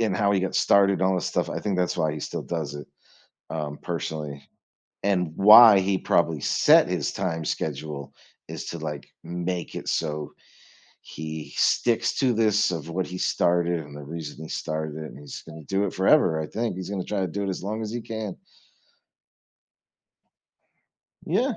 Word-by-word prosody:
and 105 -5 +1
how 100 0 +2
he 95 - +2
got 95 - -2
started 100 -1 +4
all 95 0 +3
this 90 - -2
stuff. - - -1
I - - -3
think 100 -3 -1
that's 90 -1 0
why 80 -3 +1
he 75 - -5
still - - -4
does 80 -4 -4
it, 75 -2 -8 0.6
um, 75 -2 -4
personally 75 -4 -5 0.6
and 90 -5 +1
why 105 0 +9
he 95 0 +1
probably 85 -4 +1
set - - +5
his - - -1
time 85 -4 -2
schedule 75 -2 -4 0.3
is - - -6
to, 85 - -5
like, 75 -2 -6
make 90 +1 -4
it - - -4
so 75 -2 -2 0.7
he 80 0 -7
sticks 120 -2 +2
to 130 -3 +3
this 105 -4 +2
of 80 -1 -5
what 90 +2 -2
he 90 - -7
started 85 -1 +1
and 75 -2 -10
the 75 - -8
reason 80 +1 -7
he - - -9
started 80 -1 -4
it, 80 0 -6
and - - -12
he's 75 - -9
gonna 80 0 -10
do 95 +7 0
it 100 - -3
forever 95 - +4
I 80 - -3
think 115 -4 -2
he's 95 0 -6
gonna 95 -3 -3
try 105 -2 -2
to 95 - 0
do 100 +4 -3
it - - -2
as 95 - -4
long 105 +3 -3
as 110 -1 -4
he 120 - -3
can. 110 -4 -5 2.9
Yeah. - - 0
90 Hz, 185 wpm, -25 LUFS, 80-100 Hz, 2.9 s, why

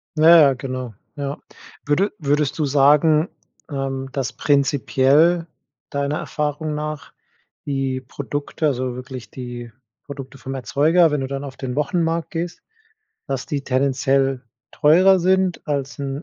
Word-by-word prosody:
Ja, 165 +2 +8
ja, 140 -3 +6
genau. 130 -2 -5 0.2
Ja. 140 -1 -4 0.5
Würde 175 +8 +1
würdest 145 -1 0
du 155 - +2
sagen, 150 +4 +4 0.4
ähm, 135 -1 -3
dass 130 -4 -3
prinzipiell 145 +4 +3 0.4
deiner 140 +1 -1
Erfahrung 150 +1 -3
nach 150 0 -5 0.5
die 135 -2 -2
Produkte 145 +4 -3
also 130 -3 -1
wirklich 125 -3 -8
die 120 -2 -7 0.3
Produkte 135 -1 -9
vom 135 +1 -6
Erzeuger, 150 - +3
wenn 150 - 0
du 135 - -2
dann 140 +1 -4
auf 135 -2 -8
den 125 -2 -4
Wochenmarkt 165 +2 -1
gehst, 170 +1 -4 0.7
dass 135 -1 -3
die 145 -4 -3
tendenziell 135 0 +1 0.3
teurer 185 +6 +5
sind 185 0 +1
als 145 -1 -3
'n 140 +1 -4
140 Hz, 135 wpm, -21 LUFS, 135-155 Hz, 0.7 s, Ja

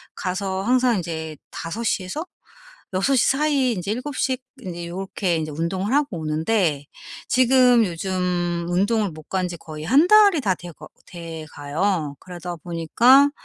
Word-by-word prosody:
가서 190 +1 -2
항상 250 0 +3
인제 160 -3 -5
5 205 +8 -5
시에서 205 - -2 0.7
6 195 +9 +2
시 250 - +3
사이에 275 -2 +2
인제 190 -1 -3
7 255 +5 -4
시 260 -1 +1 0.2
인제 175 -5 -6
요렇게 185 -1 -2
인제 155 -1 -3
운동을 185 - -2
하고 280 -10 +1
오는데 155 -1 0 0.4
지금 250 -1 +5
요즘 175 -1 -2
운동을 205 +4 +1
못 155 -1 -12
간 185 -1 0
지 175 - -6
거의 155 -2 -9
1 280 - +5
달이 405 -6 +6
다 195 -6 +1
돼 175 0 -10
거 - - -12 0.2
돼 165 -2 -8
가요. 150 +1 -2
그러다 175 -1 -7
보니까 230 - +4
185 Hz, 255 characters per minute, -22 LUFS, 170-245 Hz, 0.7 s, 달이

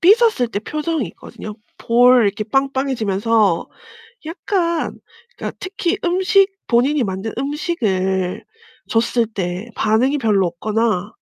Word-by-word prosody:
삐졌을 415 - +4
때 210 - -3
표정이 305 - -2
있거든요. 210 +5 -10 0.2
볼 245 +2 +5
이렇게 205 +1 -1
빵빵해지면서 230 -7 +1 0.6
약간 340 0 -1 0.4
그러니까 - - -6
특히 380 0 -2
음식, 380 +3 +3 0.2
본인이 260 +4 +2
만든 195 +2 -4
음식을 205 - -1 0.4
줬을 235 +1 +1
때 190 0 -4
반응이 240 +7 +2
별로 210 -7 +2
없거나 210 +3 -1
235 Hz, 265 characters per minute, -19 LUFS, 210-305 Hz, 0.6 s, 볼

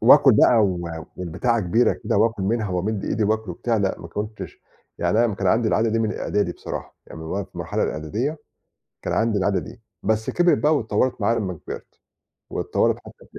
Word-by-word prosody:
وآكُل 135 +3 +7
بقى 120 +2 +6
و 90 -3 -2 0.3
والبتاعة 95 +7 0
كبيرة 105 +6 +3
كده - - -2
وآكُل 110 -2 +2
منها 110 +1 0
وأمِد 100 +3 -1
إيدي 110 0 0
وآكُل 110 -1 0
وبتاع 115 +7 -1
لأ، 100 -3 0
ما - - -9
كنتش 105 +1 -6 0.4
يعني 115 +3 +2
أنا 110 - 0
كان 95 -1 -2
عندي 110 +4 +3
العادة 115 +1 +2
دي 115 - +1
من 110 -1 0
إعدادي 105 0 0
بصراحة. - - -7
يعني - - -10
من 80 - -7
وقت 95 +3 -3
المرحلة - - -2
الإعدادية 110 - -2 0.6
كان - - -3
عندي 115 -2 +2
العادة 95 0 +1
دي. 120 - -10 0.2
بس 110 +1 0
كبرت 175 0 +3
بقى 155 +1 +3
واتطوّرت 115 -1 0
معايا 115 +3 +2
لمّا 95 -4 -2
كبرت. - - -8 0.5
واتطوّرت - - +1
حتّى - - -15
في - - -9
110 Hz, 195 wpm, -23 LUFS, 95-115 Hz, 0.6 s, وآكُل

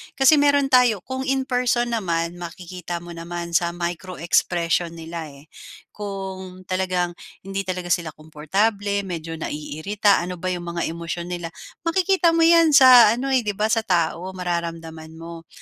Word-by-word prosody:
Kasi 280 +2 +5
meron 285 -1 +3
tayo, 245 -6 +4
kung 260 0 -5
in 270 0 +1
person 245 -2 0
naman 175 -5 -2
makikita 175 0 -7
mo 175 - -10
naman 170 0 -6
sa 170 0 +1
micro-expression 170 -1 -1
nila 165 -1 -7
eh. 140 +2 -16 0.4
Kung 190 -2 -7
talagang, 185 -2 -1 0.2
hindi 195 +1 -4
talaga 180 -1 -4
sila 170 -3 0
komportable, 200 +7 -1
medyo 165 -2 -5
naiirita, 195 +8 0
ano 180 +1 -5
ba 180 +1 -6
'yong 175 -1 -4
mga 170 0 -3
emosyon 170 +1 -5
nila. 175 -1 -4 0.4
Makikita 365 0 +3
mo 330 - +4
'yan 330 -1 +5
sa 250 -5 +9
ano 265 +3 -4
eh, 255 -3 +2
'di 210 - -1
ba, 215 +2 0
sa 225 - +3
tao, 175 0 -1
mararamdam 170 -2 -4 0.2
mo. 165 0 -10
180 Hz, 155 wpm, -22 LUFS, 170-220 Hz, 0.4 s, sa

